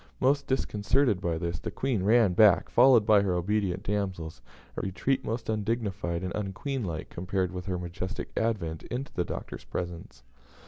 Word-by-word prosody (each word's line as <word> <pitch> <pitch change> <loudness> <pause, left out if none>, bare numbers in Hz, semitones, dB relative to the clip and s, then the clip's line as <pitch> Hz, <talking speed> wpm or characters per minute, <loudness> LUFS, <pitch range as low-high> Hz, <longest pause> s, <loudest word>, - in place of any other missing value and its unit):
Much 140 +2 +3
disconcerted 120 -3 +1
by 85 -2 -1
this, 85 0 -3
the - - -4
Queen 130 -7 -1
ran 105 -1 +4
back, 105 -1 +5
followed 120 -3 +6
by 105 -2 +6
her 95 -3 0
obedient 95 0 0
damsels 90 -8 -3 0.3
a - - -2
retreat 95 +8 -1
most 115 +1 -3
undignified 105 -5 -2
and 90 - -3
unqueenlike, 100 - -3
compared 95 0 -1
with 90 0 -6
her 90 -1 -1
majestic 90 +3 -5
advent 95 -9 -1
into 130 +3 -4
the 90 - 0
Doctor's - - -6
presence. 85 -8 -6
100 Hz, 155 wpm, -28 LUFS, 90-115 Hz, 0.3 s, followed